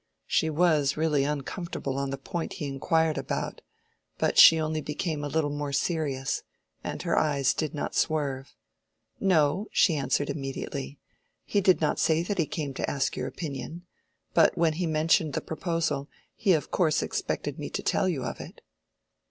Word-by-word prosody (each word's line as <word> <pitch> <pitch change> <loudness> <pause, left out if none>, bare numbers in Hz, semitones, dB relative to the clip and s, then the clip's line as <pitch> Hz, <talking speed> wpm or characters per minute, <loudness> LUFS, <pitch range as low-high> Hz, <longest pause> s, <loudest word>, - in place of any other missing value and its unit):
She 160 - +1
was 155 -3 +2
really 150 -3 +2
uncomfortable 145 -1 -3
on 140 0 -2
the 135 - -3
point 170 +4 -4
he 150 - -5
inquired 155 +3 +1
about, - - -4 0.6
but - - +1
she 165 - +10
only 155 0 -1
became 150 0 -3
a - - -2
little 145 0 0
more 145 -1 -3
serious, 135 -3 -1 0.4
and - - -4
her 170 -2 +1
eyes 140 -4 +2
did 155 -2 -3
not 145 - -3
swerve. 140 -4 -1 0.6
"No," 185 +2 +2
she 175 - +4
answered 140 0 0
immediately, 135 - -5 0.5
"he 205 - +1
did 185 -4 +4
not 155 - +1
say 160 +1 +2
that 195 +2 -3
he 160 - +2
came 145 -4 -4
to - - -2
ask 140 -2 -1
your - - -3
opinion. 160 +3 -6 0.5
But - - +4
when 165 -2 +3
he 175 +2 -2
mentioned 155 -1 +2
the - - 0
proposal, 160 -4 -2 0.3
he 200 -4 +3
of 155 - -1
course 155 -4 +2
expected - - -3
me - - -4
to - - -4
tell 185 - +1
you 145 -8 -2
of - - -4
it." - - -11
155 Hz, 170 wpm, -27 LUFS, 140-165 Hz, 0.6 s, she